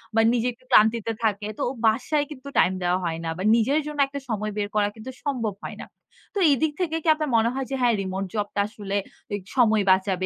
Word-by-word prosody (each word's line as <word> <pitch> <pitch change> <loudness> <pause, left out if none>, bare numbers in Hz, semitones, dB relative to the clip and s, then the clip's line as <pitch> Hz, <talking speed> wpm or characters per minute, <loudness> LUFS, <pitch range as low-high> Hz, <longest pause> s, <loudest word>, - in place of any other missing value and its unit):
বা 225 - +5
নিজে 240 0 +1
একটু 255 +2 -27
ক্লান্তিতে 220 +1 +4
থাকে। 210 -1 0
তো - - -2 0.2
বাসায় 275 +7 +1
কিন্তু 280 -1 -10
টাইম 185 - +5
দেওয়া 180 +1 +2
হয় 165 -1 -2
না। 165 - -1
বা 185 - -4
নিজের 270 +7 +2
জন্য 300 -1 -6
একটা 280 +1 -6
সময় 215 -1 -2
বের 205 -1 0
করা 205 -1 +3
কিন্তু 225 +4 -8
সম্ভব 235 -8 -1
হয় - - -6
না। - - -7 0.5
তো - - 0
এদিক 300 +3 +2
থেকে 325 -2 0
কি - - -6
আপনার 305 -2 -2
মনে 225 +1 +3
হয় 270 0 -2
যে, - - 0
হ্যাঁ 240 -2 +4
remote 190 0 -3
job 205 -1 0
টা - - 0
আসলে 205 -2 -6 0.4
এ - - +2 0.2
সময় 220 -4 +4
বাঁচাবে 190 -1 +1
220 Hz, 230 wpm, -24 LUFS, 205-265 Hz, 0.5 s, বা